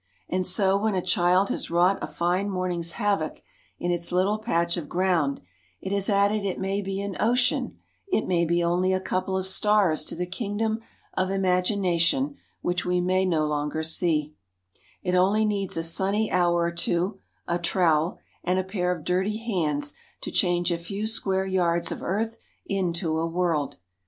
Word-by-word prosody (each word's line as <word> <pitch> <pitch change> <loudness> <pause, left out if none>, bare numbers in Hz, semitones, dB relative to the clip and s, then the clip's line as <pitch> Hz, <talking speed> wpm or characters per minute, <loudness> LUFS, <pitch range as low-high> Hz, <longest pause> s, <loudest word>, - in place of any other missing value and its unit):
And 185 0 0
so 190 +1 +3
when 215 -1 0
a 185 - +1
child 180 +2 +3
has - - -2
wrought 175 +3 +3
a - - -3
fine 180 +4 0
morning's 180 -3 -1
havoc 200 -8 -1 0.3
in 175 - -1
its 170 0 0
little 190 +4 +2
patch 170 -6 0
of 165 -5 -5
ground 175 -6 +1 0.4
it 190 - -5
has 200 0 +1
added 200 +1 +2
it 195 -2 -2
may 195 +1 -1
be 195 0 -3
an 200 -2 -4
ocean, 245 +3 +1 0.3
it 370 - +1
may 175 -2 +2
be 170 +1 +1
only 180 +2 +2
a 185 - +1
couple 185 0 -1
of 190 - -2
stars 190 -4 +3
to - - -2
the 180 +1 -2
king 200 +3 -4
dom 220 0 0 0.3
of 185 0 0
imagination 190 - +1 0.3
which 175 0 0
we 180 0 +1
may 185 +1 +2
no 160 -4 +2
longer 150 +1 -1
see/ 155 -2 +1 0.7
It 180 - -1
only 195 +4 +3
needs 200 -4 -1
a 165 - -1
sunny 195 +6 0
hour 175 -1 +3
or 170 0 +1
two, 175 +3 -1 0.3
a 175 0 0
trowel, 170 -2 +2 0.3
and 180 +1 +1
a 185 - +1
pair 185 -2 -1
of 170 -4 -4
dirty 190 +5 0
hands 155 -10 -1 0.3
to - - -5
change 175 -1 +2
a 170 - -1
few 195 +5 -4
square 190 -3 0
yards 170 -3 +1
of - - -5
earth 225 +4 -2 0.3
into 170 -4 -1
a 165 - 0
world. 165 -4 0
185 Hz, 180 wpm, -26 LUFS, 170-195 Hz, 0.7 s, so